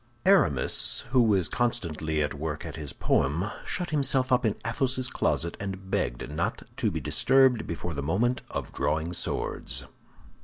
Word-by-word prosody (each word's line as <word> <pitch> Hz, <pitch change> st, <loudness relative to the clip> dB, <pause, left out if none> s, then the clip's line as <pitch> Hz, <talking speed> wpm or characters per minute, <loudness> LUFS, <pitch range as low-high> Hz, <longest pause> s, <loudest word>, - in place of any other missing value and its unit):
Aramis, 185 Hz, -, +4 dB
who 130 Hz, -2 st, +5 dB
was 100 Hz, -7 st, +3 dB
constantly 80 Hz, -10 st, -1 dB
at 75 Hz, -, -2 dB
work 75 Hz, +1 st, -4 dB
at -, -, -6 dB
his 75 Hz, -3 st, -6 dB
poem, 75 Hz, +7 st, +1 dB, 0.2 s
shut 175 Hz, -2 st, -2 dB
himself 135 Hz, -3 st, +1 dB
up 125 Hz, -2 st, +3 dB
in 105 Hz, -, 0 dB
Athos's 130 Hz, +2 st, 0 dB
closet, 85 Hz, +1 st, 0 dB
and 95 Hz, -1 st, -6 dB
begged -, -, -1 dB
not 75 Hz, +4 st, -2 dB
to -, -, +1 dB
be -, -, -3 dB
disturbed 130 Hz, -3 st, +3 dB
before 85 Hz, +1 st, -4 dB
the 70 Hz, -, -3 dB
moment 115 Hz, -, +1 dB
of -, -, -5 dB
drawing 80 Hz, +3 st, -1 dB
swords. -, -, -2 dB
95 Hz, 155 wpm, -27 LUFS, 80-125 Hz, 0.2 s, who